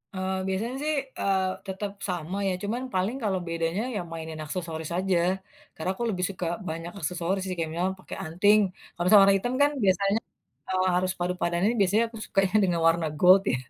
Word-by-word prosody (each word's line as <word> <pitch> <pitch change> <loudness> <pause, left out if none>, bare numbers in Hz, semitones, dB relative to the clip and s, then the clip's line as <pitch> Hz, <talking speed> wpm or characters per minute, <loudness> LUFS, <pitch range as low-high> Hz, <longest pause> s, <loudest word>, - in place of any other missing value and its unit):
Eee, 190 0 -1
biasanya 220 +7 -2
sih, 310 0 +1 0.3
eee, 190 -1 +2 0.2
tetep 195 +1 -4 0.2
sama 180 +2 -3
ya - - 0
cuman 230 +5 -2
paling 190 +7 0
kalau 190 -3 +1
bedanya 165 +4 -1
ya - - 0
mainin 160 -1 -6
aksesoris 160 -1 -4
aja. 185 -1 +1 0.6
Karena 160 +3 -4
aku 240 - -4
lebih 180 -3 0
suka 185 -2 -4 0.2
banyak 165 +2 -5
aksesoris 180 +4 -1
sih 185 - -2
kayak 160 -1 -2
misalnya 180 +3 0
pakai - - -8
anting. 200 +6 +4 0.3
Kalau 175 +1 -2
sama 205 -2 +9
warna 195 0 +6
hitam 245 +6 -2
kan 290 +1 +5
biasanya, 195 +3 +3 0.5
eee, 185 0 +1
harus 185 +1 +1
padu 180 +1 -1
padanin 175 +6 +2
biasanya 205 +4 +4
aku 225 -1 -10
sukanya 195 0 +1
dengan 170 -2 +1
warna 165 -1 +2
gold 185 +2 +7
ya. - - +2
185 Hz, 190 wpm, -27 LUFS, 170-200 Hz, 0.6 s, sama